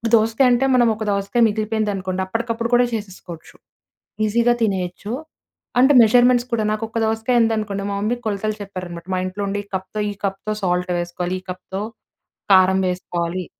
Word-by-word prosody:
దోసకాయ 225 Hz, +4 st, +3 dB
అంటే, 245 Hz, +2 st, +3 dB
మనం 240 Hz, -2 st, +4 dB
ఒక 220 Hz, -, -5 dB
దోసకాయ 200 Hz, +4 st, 0 dB
మిగిలిపోయిందనుకోండి. 205 Hz, -3 st, -2 dB
అప్పటికప్పుడు 230 Hz, +2 st, -2 dB
కూడా 245 Hz, 0 st, +5 dB
చేసేసుకోవచ్చు. 190 Hz, -6 st, -7 dB, 0.7 s
ఈజీగా 235 Hz, +3 st, +3 dB
తినేయొచ్చు. 190 Hz, +1 st, -2 dB, 0.7 s
అంటే 265 Hz, +3 st, +6 dB
మెజర్మెంట్స్ 245 Hz, +2 st, +4 dB
కూడా 230 Hz, -2 st, +1 dB
నాకు 215 Hz, +1 st, -2 dB
ఒక 230 Hz, -, -5 dB
దోసకాయ 225 Hz, +2 st, +1 dB
ఉందనుకోండి. 215 Hz, -3 st, -1 dB
మా 200 Hz, -, -2 dB
మమ్మీ 225 Hz, +4 st, 0 dB
కొలతలు 215 Hz, 0 st, -2 dB
చెప్పారనమాట. 180 Hz, -4 st, -7 dB
మా 185 Hz, -, 0 dB
ఇంట్లో 185 Hz, +2 st, -4 dB
ఉండే 205 Hz, +1 st, -2 dB
ఈ -, -, -28 dB
కప్‌తో, 190 Hz, +3 st, -5 dB
ఈ -, -, -6 dB
కప్‌తో 195 Hz, +2 st, -3 dB
సాల్ట్ 180 Hz, 0 st, 0 dB
వేసుకోవాలి, 175 Hz, +1 st, -3 dB
ఈ -, -, -35 dB
కప్‌తో 185 Hz, +2 st, -6 dB, 0.7 s
కారం 190 Hz, 0 st, +5 dB
వేసుకోవాలి. 180 Hz, 0 st, -3 dB
205 Hz, 155 wpm, -21 LUFS, 185-225 Hz, 0.7 s, అంటే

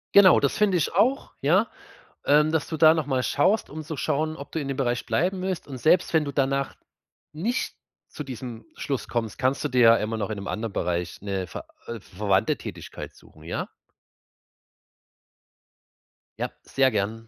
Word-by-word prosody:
Genau 195 Hz, -3 st, +8 dB
das 140 Hz, -, +1 dB
finde 200 Hz, -3 st, +3 dB
ich 160 Hz, -, 0 dB
auch, 265 Hz, +4 st, +2 dB
ja? 185 Hz, +11 st, +4 dB, 0.6 s
Ähm, 150 Hz, +2 st, +4 dB
dass 160 Hz, -2 st, 0 dB
du 160 Hz, -, -4 dB
da 155 Hz, +1 st, +7 dB
noch 160 Hz, -4 st, -2 dB
mal 130 Hz, -2 st, +1 dB
schaust, 195 Hz, -, +2 dB
um 155 Hz, +2 st, -5 dB
zu 155 Hz, 0 st, -6 dB
schauen, 155 Hz, +4 st, 0 dB
ob 140 Hz, -, -9 dB
du 160 Hz, -, -2 dB
in 145 Hz, -, -4 dB
dem 135 Hz, -1 st, -3 dB
Bereich 120 Hz, -3 st, 0 dB
bleiben 185 Hz, +2 st, 0 dB
willst. 185 Hz, -2 st, -3 dB
Und 135 Hz, -2 st, -6 dB
selbst 160 Hz, +7 st, +3 dB
wenn 160 Hz, -1 st, +4 dB
du 145 Hz, -, -4 dB
danach 135 Hz, 0 st, 0 dB, 0.6 s
nicht 225 Hz, -, -2 dB, 0.3 s
zu 150 Hz, -, -7 dB
diesem 125 Hz, -3 st, -7 dB
Schluss 140 Hz, -4 st, -3 dB
kommst, 115 Hz, -3 st, -3 dB
kannst 130 Hz, +2 st, +1 dB
du -, -, 0 dB
dir 125 Hz, 0 st, +2 dB
ja 115 Hz, -1 st, +8 dB
immer 110 Hz, +1 st, -2 dB
noch 105 Hz, -1 st, -2 dB
in 110 Hz, -, -2 dB
'nem 100 Hz, 0 st, -6 dB
anderen 110 Hz, 0 st, -3 dB
Bereich 85 Hz, -1 st, -2 dB
'ne 95 Hz, -2 st, -2 dB
ver -, -, -8 dB, 0.2 s
äh, 115 Hz, -1 st, -5 dB
verwandte 95 Hz, 0 st, 0 dB
Tätigkeit -, -, -8 dB
suchen, 80 Hz, -, -19 dB
ja? 80 Hz, -, -3 dB, 2.7 s
Ja, -, -, -1 dB
sehr 135 Hz, -1 st, +2 dB
gern. 110 Hz, +1 st, -1 dB
135 Hz, 185 wpm, -25 LUFS, 115-160 Hz, 2.7 s, Genau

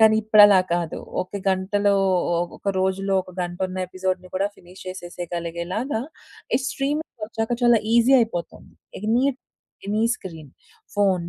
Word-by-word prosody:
కానీ 220 Hz, 0 st, +6 dB
ఇప్పుడలా 205 Hz, -2 st, +7 dB
కాదు. 170 Hz, -2 st, -2 dB, 0.2 s
ఒక 200 Hz, +2 st, -7 dB
గంటలో 200 Hz, +2 st, +1 dB, 0.6 s
ఒక -, -, -4 dB
రోజులో 195 Hz, +1 st, 0 dB
ఒక 185 Hz, -, -14 dB
గంట 175 Hz, 0 st, -5 dB
ఉన్న 185 Hz, 0 st, -6 dB
ఎపిసోడ్‌ని 185 Hz, 0 st, -3 dB
కూడా 195 Hz, +2 st, +1 dB
ఫినిష్ 180 Hz, +2 st, -14 dB
చేసేయగలిగేలాగా 175 Hz, -, -4 dB, 0.6 s
ఈ -, -, +1 dB
స్ట్రీమింగ్ 280 Hz, -4 st, -3 dB
ఒచ్చాక 225 Hz, +1 st, -2 dB
చాలా 240 Hz, -2 st, +5 dB
ఈసీ 235 Hz, +3 st, +5 dB
అయిపోతుంది. 175 Hz, -7 st, -4 dB, 0.3 s
Any 225 Hz, +5 st, +2 dB, 0.6 s
any 210 Hz, +2 st, 0 dB
screen. 165 Hz, -, -10 dB, 0.5 s
ఫోను 200 Hz, -2 st, +3 dB
195 Hz, 130 wpm, -23 LUFS, 180-220 Hz, 0.6 s, ఇప్పుడలా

